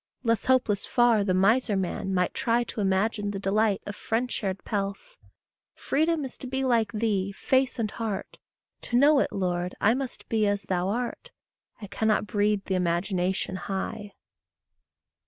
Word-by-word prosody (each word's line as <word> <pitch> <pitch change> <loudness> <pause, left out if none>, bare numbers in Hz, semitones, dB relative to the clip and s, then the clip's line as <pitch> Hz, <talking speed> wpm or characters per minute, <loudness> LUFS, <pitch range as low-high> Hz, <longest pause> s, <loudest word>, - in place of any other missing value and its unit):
Less 230 -3 +1
hopeless 245 -6 +2
far 240 -4 +4
the 185 -2 +1
miser 210 +3 +3
man 190 +1 -2
might 180 -1 +1
try 235 0 +1
To 220 - -5
image 195 +3 +1
the 205 -1 -3
delight 200 +1 +1
of 205 - -6
friend 235 +2 -2
shared 195 -2 -3
pelf. 200 - -4 0.6
Freedom 315 0 0
is 260 - -9
to 260 - -7
be 265 +1 -2
like 235 -5 +2
thee, 210 -3 0
face 260 +6 +1
and 220 -3 -1
heart; 220 -4 -5 0.4
To 240 - -1
know 285 +2 +6
it, - - 0
Lord, 180 -2 -2
I 220 - +4
must 265 0 -5
be 215 -2 +1
as 205 0 0
thou 185 -1 -1
art, 245 - -3 0.5
I 215 - -7
cannot 215 +2 0
breed 205 -1 0
the 190 - -2
imagination 180 +1 0
high. 200 +2 -5
210 Hz, 160 wpm, -27 LUFS, 195-240 Hz, 0.6 s, know